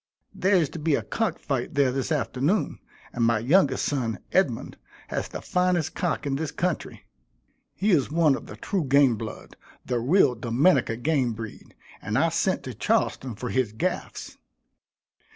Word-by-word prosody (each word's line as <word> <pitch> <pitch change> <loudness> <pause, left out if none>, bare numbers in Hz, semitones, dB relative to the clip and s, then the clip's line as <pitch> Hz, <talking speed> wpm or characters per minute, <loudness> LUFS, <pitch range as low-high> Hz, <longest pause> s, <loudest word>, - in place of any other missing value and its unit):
There 190 +2 +2
is 170 -5 +3
to 165 - -7
be 150 -1 +2
a - - -2
cock 225 -1 -1
fight 135 -1 -3
there 140 -3 +3
this 135 +4 -2
afternoon, 150 +5 0 0.3
and 120 - -1
my 115 0 +3
youngest 135 - +3
son, 120 -7 -1
Edmund, - - 0 0.3
has - - -2
the - - -8
finest 180 -3 +1
cock 165 -4 -2
in 135 -1 -1
this 155 0 -2
country. 175 +2 -3 0.7
He 205 +2 +1
is 145 -8 +3
one 155 -1 +3
of - - -8
the - - -9
true 190 -6 -2
game 135 -2 +4
blood, 110 0 -8 0.3
the 125 -1 -1
real 140 +2 +4
Dominica 120 +2 +2
game 130 -2 +1
breed; 110 -1 -9 0.3
and - - -2
I - - +3
sent - - 0
to - - -6
Charleston 125 -4 0
for 125 +3 -5
his 130 -5 0
gaffs. 110 - -4
140 Hz, 170 wpm, -26 LUFS, 120-165 Hz, 0.7 s, game